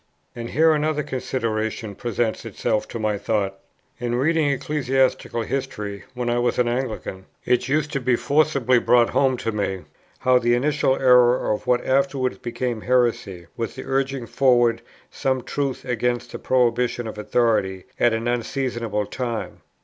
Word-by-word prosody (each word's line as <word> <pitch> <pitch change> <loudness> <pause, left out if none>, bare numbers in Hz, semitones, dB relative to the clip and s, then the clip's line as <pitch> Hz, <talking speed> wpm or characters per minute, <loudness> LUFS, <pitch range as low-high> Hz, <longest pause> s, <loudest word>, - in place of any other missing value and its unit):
And 120 -1 -6
here 160 +3 +4
another 150 0 0
consideration 110 -5 -3
presents 115 +1 -2
itself 105 - -1
to - - -6
my 105 -2 -1
thoughts. 100 -2 -1 0.4
In 120 0 -1
reading 155 +3 +2
ecclesiastical 135 -3 0
history, 105 -6 -4
when 125 -1 -3
I 120 0 +1
was 120 -1 0
an 125 - +2
Anglican, 120 -6 -3 0.2
it 125 0 +2
used 150 +2 0
to 140 - 0
be 125 -1 +2
forcibly 140 -4 +2
brought 120 0 +4
home 130 -2 +2
to 115 - -2
me, 100 -3 -2 0.3
how 130 -1 +3
the 120 0 +2
initial 140 +1 +1
error 125 -2 +4
of 105 - -6
what 125 -1 +2
afterwards 135 -1 +1
became 120 -1 -3
heresy 115 -8 0
was 115 -2 -4
the - - -6
urging 135 -1 -1
forward 120 -2 +3 0.3
some 130 -2 -1
truth 140 -2 -3
against 120 -1 -1
the - - -6
prohibition 120 -1 +1
of 110 -1 -6
authority 105 -4 +1 0.2
at 120 - +4
an 115 +1 -2
unseasonable 120 -3 -1
time. 120 -1 -4
120 Hz, 155 wpm, -23 LUFS, 115-130 Hz, 0.4 s, here